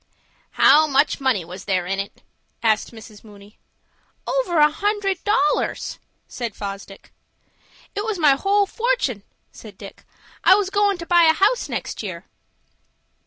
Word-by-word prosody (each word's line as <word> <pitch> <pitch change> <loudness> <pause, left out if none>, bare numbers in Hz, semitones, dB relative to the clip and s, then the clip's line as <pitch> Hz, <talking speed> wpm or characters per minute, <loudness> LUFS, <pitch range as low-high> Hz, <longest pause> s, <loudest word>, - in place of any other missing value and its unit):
"How 310 +2 +5
much 280 0 +1
money 250 -10 0
was 180 +3 -10
there 185 -3 0
in 195 +2 -3
it?" 200 - -7 0.4
asked 220 -2 +1
Mrs. 220 -2 -14
Mooney. 205 -1 -17 0.7
"Over - - -1
a 300 0 +5
hundred 395 +1 -2
dollars," 400 -1 0 0.3
said 235 -4 -6
Fosdick. 195 -1 -8 0.8
"It 410 - -3
was 435 -2 -3
my 305 -4 +4
whole 400 +8 +2
fortun'," 450 - -1 0.3
said 210 -4 -13
Dick. 200 -2 -12 0.4
"I 375 - +7
was 395 -1 -1
goin' 405 -1 +2
to 340 - -8
buy 345 0 +4
a 320 - +5
house 405 +8 +1
next - - -5
year." 185 -4 -7
300 Hz, 145 wpm, -21 LUFS, -, 0.8 s, I